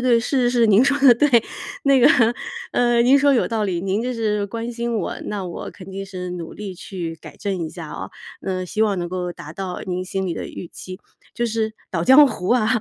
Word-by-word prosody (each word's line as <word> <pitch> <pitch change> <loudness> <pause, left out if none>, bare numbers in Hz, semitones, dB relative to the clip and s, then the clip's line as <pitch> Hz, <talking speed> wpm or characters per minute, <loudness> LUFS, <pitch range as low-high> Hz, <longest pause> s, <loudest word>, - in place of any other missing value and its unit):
对， 235 - +6
是 245 +1 +1
是 245 0 +1
是， - - +6
您 215 +1 +6
说 280 +2 +3
的 270 -4 +7
对， 295 +6 +3 0.5
那 275 -2 +4
个， - - +7 0.6
嗯， 240 -1 +3
您 270 +3 +6
说 280 0 +4
有 240 - +2
道 220 -2 -1
理， 175 -4 -2
您 195 +3 0
这 250 0 -2
是 210 -3 0
关 230 +3 -5
心 235 0 -2
我， 205 - -3
那 205 -2 -3
我 175 -2 -6
肯 190 0 -12
定 195 +1 -6
是 180 -2 -6
努 175 -2 -6
力 200 -3 -7
去 175 -2 -6
改 - - -12
正 190 -5 -3
一 - - -6
下 165 -1 -8
哦， - - -6 0.3
那 185 -1 -3
希 210 +4 -4
望 210 -3 +2
能 175 -1 -4
够 180 -1 -3
达 155 -3 -9
到 185 -1 -5
您 185 0 -3
心 190 0 -2
里 175 - -1
的 - - -5
预 - - -8
期。 185 +2 -9 0.4
“就 240 - 0
是 220 -1 -1 0.2
捣 165 -3 -1
糨 265 +8 +8
糊 185 -8 -4
啊， 240 -3 +3
205 Hz, 255 characters per minute, -21 LUFS, 185-235 Hz, 0.6 s, 糨